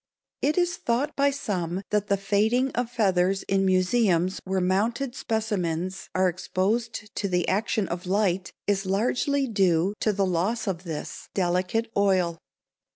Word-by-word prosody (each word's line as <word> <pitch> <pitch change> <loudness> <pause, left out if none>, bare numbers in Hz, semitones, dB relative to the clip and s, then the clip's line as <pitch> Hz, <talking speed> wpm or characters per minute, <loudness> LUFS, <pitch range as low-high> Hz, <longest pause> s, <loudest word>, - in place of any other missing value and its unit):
It 300 +4 +1
is 350 -1 +1
thought 260 +4 -1
by 280 0 +3
some 190 -9 -3
that 210 -1 +1
the 200 - +2
fading 220 +7 +1
of 245 -1 -2
feathers 195 -5 +1
in 195 0 +1
museums 185 -1 +2
where 190 0 0
mounted 220 +8 0
specimens 190 -6 -2
are 185 0 +4
exposed 210 +5 -2
to 200 - -1
the 180 -2 0
action 210 0 0
of 175 +1 -5
light 190 -1 +1
is 195 -1 0
largely 250 +8 +1
due 190 -4 +2
to 215 - +2
the 200 -1 +1
loss 190 +6 0
of 190 -3 -3
this 160 -3 -6
delicate 185 +5 0
oil. 185 -4 +2
195 Hz, 150 wpm, -26 LUFS, 185-225 Hz, -, are